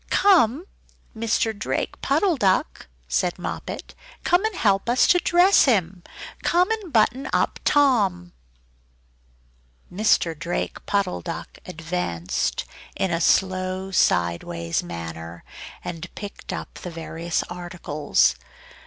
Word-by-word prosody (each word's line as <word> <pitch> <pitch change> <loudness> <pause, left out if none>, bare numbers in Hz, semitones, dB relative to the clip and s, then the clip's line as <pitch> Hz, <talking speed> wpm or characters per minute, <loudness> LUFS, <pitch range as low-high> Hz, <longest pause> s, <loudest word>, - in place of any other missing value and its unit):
"Come! 335 - +4 0.5
Mr. 225 0 0
Drake 205 - -3
Puddle 375 -5 +2
Duck," 205 - 0 0.2
said - - 0
Moppet - - -6 0.3
"Come 355 +3 +3
and 440 -3 -1
help 200 - +1
us 245 +1 +4
to 355 - +5
dress 355 +3 +5
him! 190 - +1 0.4
Come 360 +4 +2
and 425 -6 -3
button 240 +3 +2
up - - 0
Tom!" 200 -12 +2 1.6
Mr. 195 -4 +2
Drake 170 +3 -4
Puddle 200 -3 0
Duck 170 -2 -7
advanced 160 - -2 0.3
in 190 - -1
a 165 0 0
slow 185 +1 +1
sideways 85 - +1
manner, 85 -1 -7 0.4
and 170 0 -6
picked 205 -1 -8
up - - -6
the 180 - -6
various 165 0 -3
articles. 175 - 0
185 Hz, 110 wpm, -23 LUFS, 165-240 Hz, 1.6 s, to